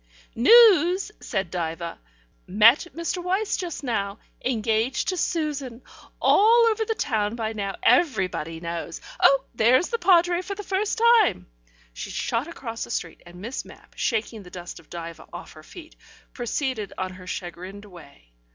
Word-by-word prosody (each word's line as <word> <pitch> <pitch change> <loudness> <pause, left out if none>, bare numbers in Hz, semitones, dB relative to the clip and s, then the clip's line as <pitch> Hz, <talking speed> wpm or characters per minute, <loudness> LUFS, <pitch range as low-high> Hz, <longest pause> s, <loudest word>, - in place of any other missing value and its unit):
"News," 380 - +6
said 190 -3 -3
Diva. 170 -1 -4 0.5
"Met 220 - +5
Mr. 335 +2 -3
Wyse 385 +4 0
just 345 -5 -5
now. 200 -5 -2 0.3
Engaged 225 0 0
to 370 - -1
Susan. 290 -8 -3 0.4
All 460 +3 +5
over 445 0 -1
the 445 0 -2
town 215 - -1
by 225 -2 -3
now. 200 -2 -4
Everybody 190 - +1
knows. 170 0 -5 0.2
Oh, 275 -1 +5
there's 240 +8 +3
the 465 - -2
Padre 350 -1 +4
for 395 +2 -6
the 415 - -7
first 395 +2 -1
time." 460 - +4 0.5
She - - -7
shot 235 +6 -2
across 235 -9 -6
the - - -8
street, 165 -8 -4
and 175 +1 -12
Miss 235 +6 -5
Mapp, - - -16
shaking 225 -1 -2
the 180 - -13
dust 175 -1 -9
of 165 - -21
Diva 170 -1 -8
off - - -9
her 155 - -13
feet, 320 - -13 0.4
proceeded 245 -3 -3
on 185 0 -3
her 185 0 -12
chagrined 185 +3 -7
way. 140 - -16
230 Hz, 155 wpm, -24 LUFS, -, 0.5 s, News